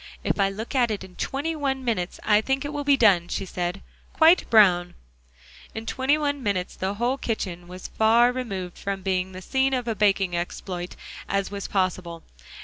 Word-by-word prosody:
"If - - -1
I 195 0 +3
look 215 +4 -6
at 250 -3 +3
it 210 -3 -3
in 185 -1 -13
twenty 295 +4 -2
one 270 -3 -2
minutes, 190 -7 -2
I 210 0 +4
think 270 +4 -1
it 290 - -4
will 290 0 -3
be 280 -1 +4
done," 190 -8 +4
she 195 - -3
said, 180 +1 -4 0.3
"quite 330 +2 +5
brown." 180 -5 +5 0.8
In 220 0 -5
twenty 265 +5 +1
one 285 -2 -1
minutes 200 -6 -2
the 190 +2 -3
whole 245 +5 0
kitchen 180 -8 -4
was 180 +1 -10
as - - -6
far 230 +2 +4
removed 195 -8 -5
from 195 -1 -4
being 185 -1 -1
the 185 0 -9
scene 265 +3 +1
of 250 -2 -3
a 230 - +1
baking 195 -4 +2
exploit 175 +1 -5 0.3
as 200 0 -1
was 200 -1 -5
possible. 185 -3 -2
205 Hz, 195 wpm, -25 LUFS, 185-255 Hz, 0.8 s, quite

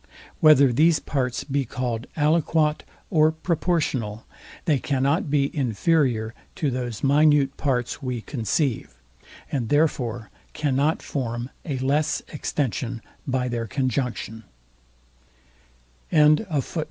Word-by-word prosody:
Whether 140 -4 +6
these 160 +5 +4
parts 130 -4 -2
be 140 -1 -1
calld 125 -1 -3
ALIQUOT 155 0 +2 0.3
or 155 -3 +4
PROPORTIONAL, 160 - -1 0.4
they 150 -5 +2
cannot 140 +3 0
be 140 0 +1
inferior 125 -2 +1 0.2
to 145 -4 -1
those 120 -3 -4
minute 145 -1 +4
parts 125 -1 -1
we 125 -3 -3
conceive; 120 - -2 0.6
and 120 -6 -2
therefore 125 -7 0 0.2
cannot 145 +1 0
form 120 -2 -4
a 140 -5 -2
less 140 +4 0
extension 125 -5 -3 0.2
by 130 -1 0
their 120 -2 -3
conjunction. 120 -1 -2
135 Hz, 100 wpm, -24 LUFS, 120-150 Hz, 0.6 s, Whether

